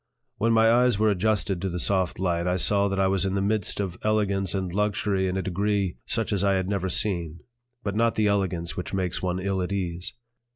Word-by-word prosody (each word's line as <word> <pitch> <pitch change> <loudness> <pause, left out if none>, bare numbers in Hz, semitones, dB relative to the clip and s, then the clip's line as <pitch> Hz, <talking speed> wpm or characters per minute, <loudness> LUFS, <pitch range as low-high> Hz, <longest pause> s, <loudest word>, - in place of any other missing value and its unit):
When 115 +1 +1
my 115 0 +5
eyes 120 -2 +3
were 110 0 +3
adjusted 100 -2 0
to 95 - -1
the 90 - -4
soft 95 0 +1
light, 85 -2 -1
I 90 - +1
saw 100 +2 +3
that 100 0 -2
I 95 - +3
was 95 -1 +1
in 95 0 -1
the - - +1
midst 105 -1 0
of 95 -3 -3
elegance 100 -4 +1
and 95 -2 -3
luxury 100 -1 0
in 95 +1 -2
a 95 - -1
degree 100 0 -1
such - - 0
as 100 -1 +1
I 100 -1 +3
had 95 -1 -1
never 95 -2 -1
seen; 85 -4 -2 0.4
but 100 - -2
not 115 +1 +2
the 110 - +1
elegance 95 -4 0
which 90 +2 -4
makes 90 -2 -1
one 90 0 -1
ill 95 0 -1
at 90 - -3
ease. 90 -2 -3
95 Hz, 225 wpm, -25 LUFS, 90-105 Hz, 0.4 s, my